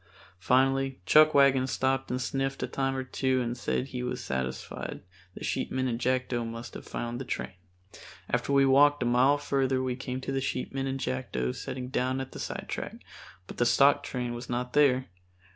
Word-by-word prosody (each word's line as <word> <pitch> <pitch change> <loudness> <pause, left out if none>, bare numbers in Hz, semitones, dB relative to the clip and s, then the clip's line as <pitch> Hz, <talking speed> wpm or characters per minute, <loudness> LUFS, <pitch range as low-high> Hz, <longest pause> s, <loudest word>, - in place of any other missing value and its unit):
Finally 135 +5 +2
Chuckwagon 140 - +6
stopped 135 0 0
and 125 - -1
sniffed 135 +1 -2
a - - -1
time 135 -1 -1
or 130 - -2
two 130 0 0
and 120 -1 -2
said 125 +2 -2
he 125 -1 -4
was 125 0 -3
satisfied 65 -1 -4 0.3
the - - -8
sheepmen 130 0 -1
and 120 -2 -2
Jackdo 125 -1 0
must 115 +1 -7
have - - -9
found 120 +1 -4
the - - -3
train. 120 - -4 0.7
After - - -1
we 140 -1 +5
walked 145 +1 +5
a - - -1
mile 125 +4 +4
further 135 -2 0
we 130 -1 -1
came 130 0 -4
to 135 - -4
the 135 0 -1
sheepmen 135 +1 -2
and 135 0 -2
Jackdo 65 - -2
setting 125 -1 -6
down 130 +1 0
at 135 0 -6
a - - -6
sidetrack, - - -5 0.5
but - - -10
the 120 - +2
stock 140 +4 +5
train 125 -4 -3
was 120 +1 -7
not 125 +1 -2
there. 130 -3 +4
130 Hz, 185 wpm, -29 LUFS, 125-135 Hz, 0.7 s, Chuckwagon